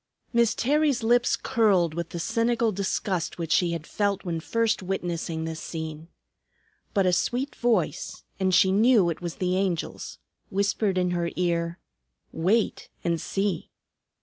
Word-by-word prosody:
Miss 235 -2 +3
Terry's 285 -1 +2
lips 240 +1 +3
curled 200 -9 +2
with 170 0 -4
the - - -6
cynical 230 +5 +1
disgust 190 -2 -2
which 165 -2 -4
she 170 0 +3
had 165 -2 -5
felt 200 +1 -1
when 170 -2 -2
first 230 +6 0
witnessing 170 -3 -3
this 160 -1 -4
scene. 160 -1 -6 0.9
But 195 -2 +3
a 180 - +3
sweet 255 +9 0
voice 225 -9 0 0.2
and 190 -1 +2
she 185 +1 +5
knew 210 -3 +4
it 165 - -7
was 170 -2 -4
the 185 0 0
Angel's 185 -4 -2 0.3
whispered 200 0 0
in 180 -1 +1
her 175 -1 0
ear, 170 -1 0 0.5
"Wait 195 +7 0
and 170 -2 0
see!" 195 -4 -2
185 Hz, 150 wpm, -26 LUFS, 170-220 Hz, 0.9 s, she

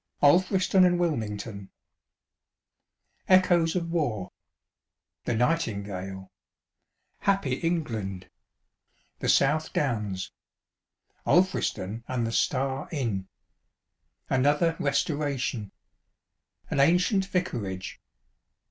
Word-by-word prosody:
ALFRISTON 185 +5 +4
AND 175 -1 +4
WILMIXGTOK 105 - -2 1.6
Echoes 175 -3 +4
of 170 -2 -2
War.ŌĆö 120 - -7
The 120 - 0
Nightingale.ŌĆö 100 - -2 0.9
"Happy 195 -10 +1
England."ŌĆö 110 - -6
The - - -1
South 155 +3 +3
Downs. 105 -9 -1 1.0
ŌĆö - - +3
Alfriston 115 - 0
and 125 -3 -1
the 115 - -2
"Star" 135 +3 0
Inn. 115 - -2 1.0
ŌĆö - - +3
Another 145 +5 +3
"Resto 145 +2 +1
ration." 125 -8 -2 0.9
ŌĆö - - -25
An - - 0
Ancient 180 +6 +3
Vicarage. 115 - -3
135 Hz, 85 wpm, -27 LUFS, 105-170 Hz, 1.6 s, ALFRISTON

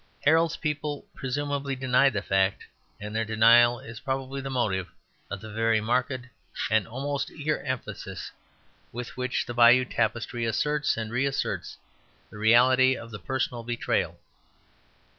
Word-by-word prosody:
Harold's 165 +2 +3
people 150 -1 -3
presumably 140 +1 -2
denied 130 +1 +3
the 105 -1 -2
fact; 95 0 +1 0.3
and 105 +1 -7
their 115 - +1
denial 115 +2 +5
is 115 0 -10
probably 135 +1 -3
the 135 - -5
motive 100 -8 -1 0.4
of 105 -2 -5
the 110 - -9
very 115 0 +2
marked 125 +3 -1 0.5
and 110 -3 +2
almost 140 +4 -3
eager 155 0 -2
emphasis 130 -3 -5 0.6
with 120 0 -7
which 130 0 -1
the 120 - -5
Bayeux 120 +2 +6
Tapestry 120 0 -1
asserts 145 +6 0
and 110 -1 -4
reasserts 135 +3 -2 0.5
the 105 - -10
reality 130 +4 +5
of 115 - -10
the 105 - -7
personal 125 +2 -2
betrayal. 120 0 -2
125 Hz, 140 wpm, -27 LUFS, 115-135 Hz, 0.6 s, Bayeux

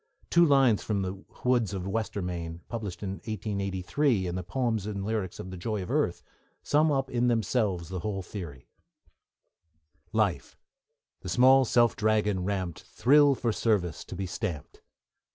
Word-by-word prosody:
Two 170 - +6
lines 135 -7 +4
from 100 -3 -1
The 95 +1 -5 0.2
Woods 120 -5 +2
of 95 - -4
Westermain, 90 -5 -3
published 105 -6 -5
in 95 0 -3
1883 100 +3 -1
in 90 - -3
the 90 - -2
Poems 110 +2 -1
and 100 -2 -4
Lyrics 105 -4 -2
of 95 - -7
the 95 - -7
Joy 105 +2 -3
of 90 - -6
Earth, - - 0 0.4
sum 155 +1 +3
up 135 -1 0
in 125 -1 +1
themselves 105 -6 0
the 95 -1 -4
whole 95 +1 -3
theory: 85 -10 -8 1.4
Life, - - 0 0.6
the - - -7
small 130 +7 +6
self 120 0 +3
dragon 105 -3 +1
ramped, 95 -3 -3
Thrill 145 +2 +4
for 120 -2 -1
service 100 -8 0
to - - -8
be 95 - -3
stamped. 90 -4 -5
105 Hz, 155 wpm, -28 LUFS, 95-120 Hz, 1.4 s, Two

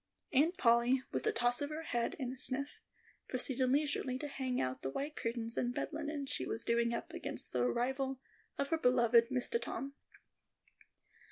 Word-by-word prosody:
Aunt 320 +7 +4
Polly, 240 -1 +4
with - - -1
a - - +4
toss 245 - +1
of 285 - -1
her 310 +1 -4
head 240 +1 -1
and 255 -4 -3
a - - -7
sniff, 275 +2 -4 0.5
proceeded 255 0 0
leisurely 275 -2 +1
to 295 - -4
hang 260 -3 -2
out 130 0 -1
the 135 - -2
white 285 - -3
curtains 230 0 -3
and 245 0 -1
bed - - -1
linen 295 -2 -3
she 270 - -1
was 225 - -2
doing 235 0 +2
up 235 - -4
against - - -3
the 125 - +1
arrival 265 - 0 0.4
of 280 0 -1
her 325 - +1
beloved 235 -3 +5
Mistah 260 - +1
Tom. 275 +1 -4
255 Hz, 180 wpm, -35 LUFS, 235-285 Hz, 0.5 s, beloved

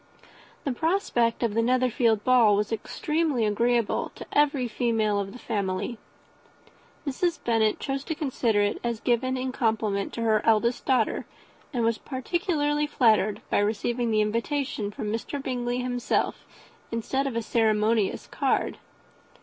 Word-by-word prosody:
The 280 - -1
prospect 250 -7 +1
of 230 -3 +1
the 230 - +2
Netherfield 240 -3 +2
ball 240 -5 +5
was 210 +2 -1
extremely 300 +2 -1
agreeable 230 +2 +1
to - - -8
every 285 -3 +3
female 220 -3 0
of 195 -1 -3
the 245 - -10
family. 205 0 -3 1.1
Mrs. 335 +5 0
Bennet 225 -2 +2
chose 270 0 -3
to 320 - -3
consider 245 -8 +1
it 205 0 0
as 235 -2 -2
given 255 +2 +1
in 255 0 -2
compliment 220 -5 0
to 230 - -3
her 220 -1 +2
eldest 230 +2 +2
daughter, 255 -5 +1 0.4
and 245 -5 -1
was 230 -1 +1
particularly 295 - -1
flattered 220 -7 +2
by - - +3
receiving 230 +3 0
the 215 -1 +3
invitation 230 +1 -1
from 210 0 -4
Mr. 230 +5 -3
Bingley 245 -2 -2
himself, 245 -1 -1 0.4
instead 265 +4 -1
of 260 - -4
a 230 - -1
ceremonious 215 -2 +1
card. - - -1
235 Hz, 140 wpm, -26 LUFS, 215-260 Hz, 1.1 s, ball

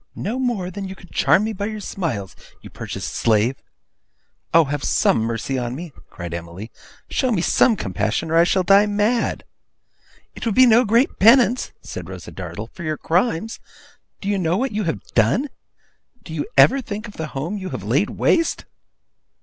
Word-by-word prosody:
No 230 +7 -3
more 225 -8 -1
than 195 +1 -6
you 190 - -8
could 180 - -17
charm 200 - +3
me 220 +1 -2
by 200 0 -3
your 215 -1 -5
smiles, 135 - -4 0.3
you - - -11
purchased - - -6
slave.' 115 +3 +1 0.9
'Oh, 165 0 +6
have 145 0 -3
some - - +2
mercy 115 +4 -2
on 120 0 -3
me!' 165 0 -8 0.2
cried 85 -2 -7
Emily. 85 +6 -7 0.4
'Show 255 - 0
me 180 -6 +1
some 230 - +4
compassion, 110 - -2
or - - +1
I 165 - +6
shall 185 +1 +2
die 200 +3 +5
mad!' 210 +3 0 0.9
'It - - -9
would 225 -4 -1
be 260 - +7
no 240 +1 +5
great 230 +5 +2
penance,' 240 +2 +5
said 90 -1 -7
Rosa 90 -3 -9
Dartle, 95 +5 -7
'for - - -11
your 155 -2 -2
crimes. 185 +4 0 0.6
Do 195 - -6
you 200 -1 +1
know 170 0 +1
what 265 +4 -1
you 210 -1 -2
have 165 - -3
done? 170 - +2 0.7
Do 160 - -9
you 150 -2 -3
ever 270 +1 +6
think 215 -1 -6
of 205 - -13
the 160 - -3
home 170 +10 -3
you 190 -1 -5
have - - -6
laid - - +1
waste? 330 -1 +1
180 Hz, 185 wpm, -21 LUFS, -, 0.9 s, be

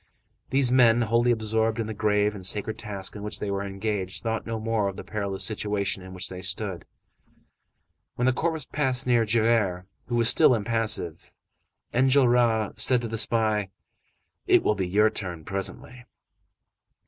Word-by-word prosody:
These 135 -2 +3
men, 120 -2 +5
wholly 115 +2 +2
absorbed 110 0 0
in 115 - -1
the 110 - -5
grave 105 0 +1
and 100 -3 -9
sacred 105 +3 -3
task 100 -3 -5
in 105 - -7
which 105 +1 -4
they 100 - -3
were 100 0 -2
engaged, 100 -1 -3
thought 110 -1 -2
no 115 -1 -3
more 110 -2 0
of 95 - -5
the - - -7
perilous 100 -2 -3
situation 105 -3 -2
in 95 0 -11
which 90 - -3
they 90 -1 -8
stood. 95 0 -3 1.3
When 125 - -1
the 130 - +3
corpse 160 0 -2
passed 130 -4 -1
near 120 -2 +3
Javert, 110 -5 +1 0.2
who 120 - -2
was 115 -1 +4
still 125 - +5
impassive, 110 -6 -1 0.6
Enjolras 120 -4 +3
said 125 -2 +3
to - - -2
the 115 0 -4
spy:— 110 -4 +1 0.8
"It - - +5
will - - +2
be 95 -3 -2
your 105 +4 +3
turn 90 -7 -6
presently!" 115 +5 -4
110 Hz, 165 wpm, -26 LUFS, 100-120 Hz, 1.3 s, men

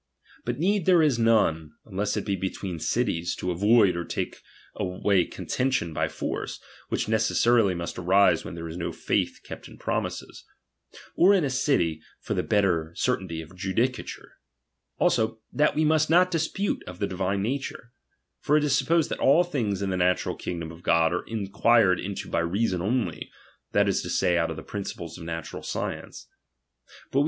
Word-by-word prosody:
But 120 0 -2
need 190 +3 +1
there 175 -3 +6
is 140 -6 +2
none, 80 -9 +2
unless 100 0 -2
it - - -2
be 100 - 0
between 95 -1 -4
cities, 85 +2 -1
to 90 - -3
avoid 100 +2 +4
or 85 - -2
take - - -4 0.3
away 90 0 +1
contention 125 -11 -2
oy - - 0
force, - - -4 0.3
which - - -1
necessarily 110 -1 +3
must 85 +1 -5
arise 90 -1 +4
where - - -7
there 85 0 -6
IS 80 +1 -7
no 85 - -3
faith - - -1
kept - - -9
in - - -14
promises: - - -4 0.7
or 195 +3 +6
in 185 - +2
a 140 - 0
city, 125 - +1 0.2
for - - -4
the - - 0
lietter 85 -5 0
certainty 95 -10 -1
of 85 +4 -15
judicature. 110 +7 -3 0.6
Also, 110 0 +1
that 150 +1 +2
we 155 +1 +2
must 155 0 +3
■^ot 180 +2 +5
dispute 170 +4 -1
of 90 - -8
the 100 - -1
divine 95 +1 -1
nature; 125 0 -4 0.5
for 150 - +2
it 150 - +1
is 145 -2 +2
sup 135 - 0
posed 165 -2 +2
that - - -3
all 150 +6 +5
things 110 - -2
in 95 - -1
the 95 - -1
natural 90 0 +1
kingdom 85 -2 -5
of 85 +1 -13
God 85 -1 +3
are 90 - -3
inquired 110 -2 +3
into 100 +1 -5
by - - 0
reason 90 +2 0
only, 105 -4 -1 0.4
that - - +3
is - - +1
to - - -6
Say, 90 - +2
out 85 -1 +1
of 80 - -4
the 80 - -7
principles 90 -4 -6
of 85 - -8
natural 80 -1 -5
science. - - -5
100 Hz, 180 wpm, -26 LUFS, 85-130 Hz, 0.7 s, there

